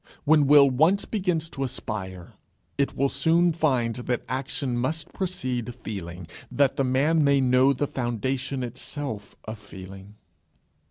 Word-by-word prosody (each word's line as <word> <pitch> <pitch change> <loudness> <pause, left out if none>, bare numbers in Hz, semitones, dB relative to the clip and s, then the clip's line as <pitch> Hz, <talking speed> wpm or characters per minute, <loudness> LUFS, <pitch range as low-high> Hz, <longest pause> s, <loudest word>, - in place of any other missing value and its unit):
When 150 -1 +4
will 145 -1 +8
once 160 +10 +3
begins 180 -6 -1
to 135 - -3
aspire, 95 -8 -5 0.4
it 140 -1 0
will 140 - +3
soon 165 +5 +2
find 130 -8 +1
that 125 0 -2
action 130 0 -2
must 145 +6 -2
precede 125 - -3
feeling, 90 -6 -7 0.3
that 140 -1 +2
the 140 - +1
man 145 +5 +2
may 140 -1 +4
know 130 +1 +4
the 140 +2 0
foundation 130 +2 -2
itself 120 -2 -6
of 110 0 -6
feeling. 95 0 -11
130 Hz, 140 wpm, -25 LUFS, 120-145 Hz, 0.4 s, will